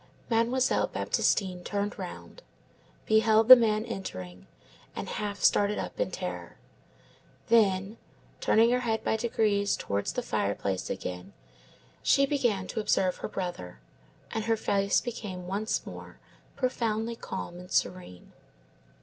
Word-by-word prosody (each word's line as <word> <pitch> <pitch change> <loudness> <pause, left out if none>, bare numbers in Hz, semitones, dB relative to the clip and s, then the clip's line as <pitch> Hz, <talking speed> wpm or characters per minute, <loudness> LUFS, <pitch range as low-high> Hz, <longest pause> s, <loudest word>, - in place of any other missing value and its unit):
Mademoiselle 235 +3 +2
Baptistine 185 -3 0
turned 205 +1 -3
round, - - -8 0.6
beheld 220 0 +4
the 255 - +14
man 220 -2 +1
entering, 90 - -7 0.5
and - - -5
half 205 -2 -4
started 205 0 +3
up - - -5
in - - +1
terror; - - -6 0.9
then, 205 -2 +3 0.4
turning 230 +2 +4
her 250 - +2
head 225 -3 -1
by - - +1
degrees 215 -3 +1
towards 100 0 -2
the - - -2
fireplace 100 -1 -2
again, 90 0 -5 0.7
she 275 - +4
began 240 -9 0
to - - -4
observe 190 -3 +1
her - - -5
brother, 175 - -5 0.5
and 220 -1 -2
her 225 0 +2
face 200 -2 +2
became 200 -7 -6
once 200 +4 -2
more - - -10 0.4
profoundly 230 -3 -1
calm 175 -5 -6
and 180 0 -11
serene. 180 - -2
210 Hz, 125 wpm, -28 LUFS, 185-230 Hz, 0.9 s, the